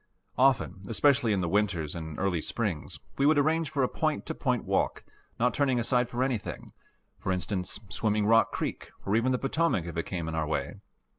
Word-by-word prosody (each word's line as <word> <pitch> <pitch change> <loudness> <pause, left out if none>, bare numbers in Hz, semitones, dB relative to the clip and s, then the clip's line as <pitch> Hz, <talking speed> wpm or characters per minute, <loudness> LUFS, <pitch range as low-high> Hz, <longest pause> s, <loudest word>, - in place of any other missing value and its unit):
Often, 130 -7 +2
especially 130 +1 +3
in 100 -3 +1
the 90 - -1
winters 95 -6 0
and 80 -2 -6
early 90 -4 0
springs, 100 -9 -3 0.2
we 140 - +4
would 155 0 +5
arrange 160 +2 +2
for 140 -3 0
a - - +3
point - - -1
to - - -3
point - - -1
walk, - - 0 0.4
not 125 +1 +2
turning 135 -4 +2
aside 125 +1 +2
for 125 +1 -1
anything 125 -6 -3 0.5
for 95 - -2
instance, 90 0 -2
swimming 105 0 0
Rock 115 +1 +4
Creek - - -4 0.2
or 100 - +1
even 120 +3 +2
the 125 - +2
Potomac 135 - 0
if 85 -1 -6
it 85 - -2
came 85 -4 -3
in 80 - -3
our 80 -1 -1
way. 70 +2 -2
110 Hz, 200 wpm, -29 LUFS, 90-130 Hz, 0.5 s, would